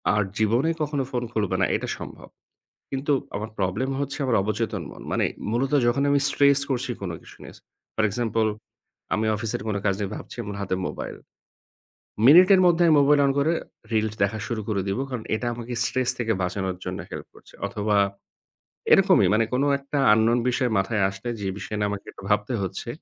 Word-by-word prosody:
আর 105 - +3
জীবনে 115 +8 +2
কখনো 145 -2 -1
ফোন 125 -1 -1
খুলবো 105 -4 0
না - - +5
এটা - - -3
সম্ভব। - - -9 0.6
কিন্তু 135 +2 -1 0.2
আমার 110 +2 -4
problem 100 +8 -1
হচ্ছে 140 0 -3
আমার 125 -3 +2
অবচেতন 110 -2 -2
মন। - - -12
মানে - - +1 0.3
মূলত 130 +4 0 0.2
যখন 135 +4 +2
আমি 140 0 +4
stress 140 -1 +4
করছি 125 -1 -1
কোনো 90 -3 -4
কিছু - - -15
নিয়ে, - - -11 0.4
for 110 - +1
example 110 0 0 0.7
আমি 110 - 0
অফিসের 110 -1 -3
কোনো 100 -2 -1
কাজ 100 - +3
নিয়ে 100 0 -3
ভাবছি - - -9
এবং 100 0 -6
হাতে 95 -1 -1
মোবাইল। - - -6 1.1
মিনিটের 185 +5 +8
মধ্যে 175 0 +4
আমি 160 - +6
মোবাইল 145 +1 +5
on 140 - +3
করে 155 +4 +2 0.4
reels 110 -1 0
দেখা 110 +3 0
শুরু 115 -2 -3
করে 100 -3 0
দিবো, 100 +7 -1
কারণ 125 -4 -4
এটা 120 +2 -3
আমাকে 120 +1 -6
stress 130 -1 0
থেকে 115 -2 +1
বাঁচানোর 95 0 -2
জন্য - - -4
help - - -7
করছে। - - -18
অথবা 105 0 0 1.0
এরকমই - - +6
মানে 115 +1 +3
কোনো 140 +3 +2
একটা 140 +1 -4
unknown 115 +2 +3
বিষয় 125 0 0
মাথায় 105 +1 0
আসছে, 100 +5 -7
যে 100 - -3
বিষয় 95 +2 -6
নিয়ে 105 - +1
আমাকে 100 -1 -6
একটু - - -13
ভাবতে 105 +4 +1
হচ্ছে, 95 - -5
115 Hz, 185 wpm, -24 LUFS, 105-135 Hz, 1.1 s, মিনিটের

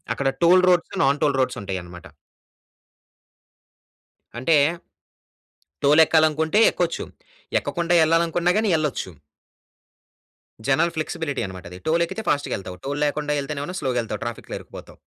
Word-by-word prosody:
అక్కడ 140 - -1 0.2
toll 180 +2 +6
roads, 180 +2 +1
non 140 +2 +2
toll 145 -3 +2
roads 130 -1 -1
ఉంటాయన్నమాట. 90 -3 -7 2.3
అంటే 130 +7 +1 1.3
టోల్ 150 +3 +6
ఎక్కాలనుకుంటే 160 +5 +2
ఎక్కొచ్చు. - - -2 0.5
ఎక్కకుండా 170 0 -2
వెళ్ళాలనుకున్నా 165 +2 +2
గాని 220 -1 0
ఎళ్ళొచ్చు... 150 -10 -2 1.6
జనాల 155 +5 +3
ఫ్లెక్సిబిలిటీ 155 -2 -3
అన్నమాట 95 -1 -9
అది. 90 - -9
టోల్ 165 +2 +2
ఎక్కితే 220 +6 -6
ఫాస్ట్‌గా 145 0 0
వెళ్తావు. 95 -2 -8
టోల్ 145 +1 -3
లేకుండా 150 0 -1
వెళ్తేనేమైనా 145 +4 -5
స్లోగా 130 -3 -1
వెళ్తావు 110 -3 -4
ట్రాఫిక్‌లో 120 -1 -6
ఇరుక్కుపోతావు. - - -12
150 Hz, 120 wpm, -23 LUFS, 130-165 Hz, 2.3 s, టోల్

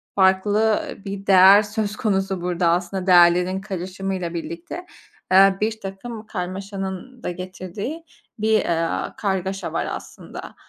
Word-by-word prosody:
farklı, 190 +2 +3 0.3
ııı, - - -10
bir 195 0 -6
değer 195 +1 +8
söz 210 0 -3
konusu 195 -4 -1
burada 175 0 0
aslında 180 +2 -1
değerlerin 180 +1 +5
karışımıyla 190 -2 -4
birlikte, 170 - -6 0.5
ııı, 195 0 +6
birtakım 220 +1 -4
karmaşanın 195 +5 -5
da - - -2
getirdiği 185 - -6 0.4
bir, 215 0 +2
ııı, 165 -1 -1
kargaşa 190 -1 -2
var - - -1
aslında. - - -9
190 Hz, 120 wpm, -22 LUFS, 180-205 Hz, 0.5 s, değer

